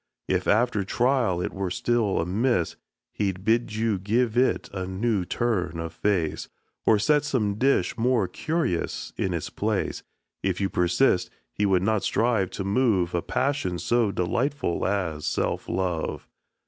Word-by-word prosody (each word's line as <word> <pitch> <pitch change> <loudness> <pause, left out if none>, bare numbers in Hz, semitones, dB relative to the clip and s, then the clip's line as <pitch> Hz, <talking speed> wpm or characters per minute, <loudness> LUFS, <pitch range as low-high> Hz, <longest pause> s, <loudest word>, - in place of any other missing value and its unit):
If - - 0
after 110 -1 +2
trial 120 -3 +1
it - - -3
were 95 -1 -2
still 115 +1 +1
amiss, 95 +1 0 0.4
He'd 95 -2 -2
bid 115 -1 +1
you 110 -3 0
give 110 +4 +1
it 130 +2 +2
a 95 -2 -3
new 100 0 0
turn 95 -7 -1
of 85 -1 -5
face, 90 -7 -1 0.4
Or 110 - +6
set 150 +8 +3
some 110 -8 0
dish 135 +1 +2
more 120 -4 +2
curious 155 - -2
in 95 - -1
its 85 -3 -3
place. - - -1 0.4
If 95 -2 -1
you 100 -1 0
persist, 90 +3 +2 0.2
he 105 - +1
would 95 -2 +2
not 110 0 +2
strive 110 -5 +1
to 95 - -5
move 100 -4 +2
A 85 - +1
passion 130 -8 -1
so 115 +5 +1
delightful 115 - -1
as 85 -6 -2
self - - -1
love. 90 -3 -2
100 Hz, 150 wpm, -26 LUFS, 90-120 Hz, 0.4 s, Or